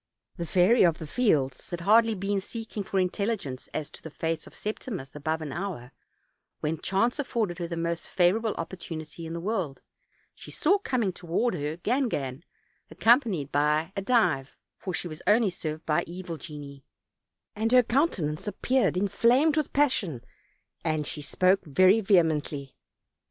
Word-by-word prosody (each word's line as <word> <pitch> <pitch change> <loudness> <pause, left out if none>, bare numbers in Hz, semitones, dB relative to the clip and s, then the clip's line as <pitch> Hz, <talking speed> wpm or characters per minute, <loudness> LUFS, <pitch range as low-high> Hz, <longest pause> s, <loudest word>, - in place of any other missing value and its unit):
The 170 -2 -4
Fairy 190 +8 +4
of 170 -3 +4
the 160 - -7
Fields 145 - +1
had 175 -1 -4
hardly 225 +4 +5
been 195 +1 -1
seeking 225 0 -6
for 195 0 -3
intelligence 185 - -2
as 155 -2 -3
to - - -11
the 160 - -8
fate 160 +1 -3
of - - -14
Septimus 205 - -5
above 155 +2 -2
an 150 - -5
hour, 165 -8 -5 0.7
when 155 +1 -2
chance 235 +8 +1
afforded 220 -10 -1
her 170 - -2
the 170 0 -5
most 170 0 -2
favorable 205 +5 +2
opportunity 165 -2 -6
in 165 - -6
the 170 - -3
world; 180 -7 -3 0.5
she - - -12
saw 390 +6 +2
coming 240 - -1
toward 180 +8 -1
her 150 -1 -3
Gangan, 170 - -1 0.5
ac - - -14
companied 225 - +3
by 150 +5 +1
a 195 - -1
Dive, 175 - +1 0.2
for 190 - -4
she 175 - -2
was 155 -1 -8
only 210 0 +4
served 155 -3 -5
by 150 - +2
evil 175 -1 -6
genii, 140 -2 -9 0.7
and 220 +2 0
her 250 0 +7
countenance 215 - 0
appeared 235 -2 +1
inflamed 240 - +3
with 310 -2 0
pas 290 -1 +4
sion, 155 - -3 0.6
and 155 -1 0
she 150 - -4
spoke 185 +6 +2
very 185 +8 +4
vehemently. 155 -8 +1
180 Hz, 160 wpm, -27 LUFS, 155-220 Hz, 0.7 s, her